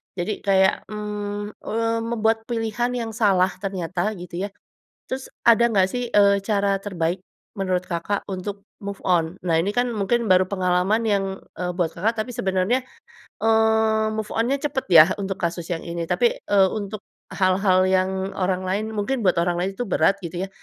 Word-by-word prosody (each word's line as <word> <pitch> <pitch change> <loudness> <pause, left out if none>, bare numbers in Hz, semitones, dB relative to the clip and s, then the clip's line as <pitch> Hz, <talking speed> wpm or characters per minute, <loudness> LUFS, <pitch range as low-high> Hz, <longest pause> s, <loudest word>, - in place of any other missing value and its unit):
jadi 185 +3 -2
kayak, 190 -1 +4 0.2
mmm, 210 0 -4
eee, 230 +1 -1
membuat 225 -1 +1
pilihan 235 +1 -1
yang 230 -2 -3
salah 195 -4 +3
ternyata 185 +1 -2
gitu 180 +1 -5
ya, - - -14 0.6
terus 260 0 -5 0.2
ada 235 0 +6
nggak 195 -4 +3
sih, 245 +1 -3
eee, 200 -1 +4
cara 200 -1 +1
terbaik, 180 -2 -2 0.3
menurut 185 -2 -1
Kakak 175 +4 -2
untuk 200 +1 -5 0.2
move 200 0 -6
on? 175 -1 +1
Nah 165 -2 +2
ini 170 +5 +1
kan 245 +2 +1
mungkin 225 +3 0
baru 185 0 +5
pengalaman 185 +2 +1
yang, 200 -2 +2 0.3
eee, 180 -1 -2
buat 165 -2 0
Kakak, 220 +6 -1
tapi - - -8
sebenarnya, 190 +6 +1 0.6
eee, 220 0 +3
move 215 -1 -3
on-nya 255 +5 +1
cepat 285 -2 -2
ya 160 -2 +10
untuk 195 -1 -4
kasus 170 0 -2
yang 165 - -2
ini 170 0 -4
tapi, 475 - +2
eee, 200 - +3
untuk 210 -1 -4 0.3
hal-hal 185 0 +3
yang 190 +1 0
orang 185 0 0
lain 200 +3 0
mungkin 220 +3 -2
buat 180 - +4
orang 175 0 0
lain 185 +2 -1
itu 245 - -3
berat 180 +1 +3
gitu 175 +2 -4
ya, - - -16
200 Hz, 170 wpm, -23 LUFS, 185-220 Hz, 0.6 s, ya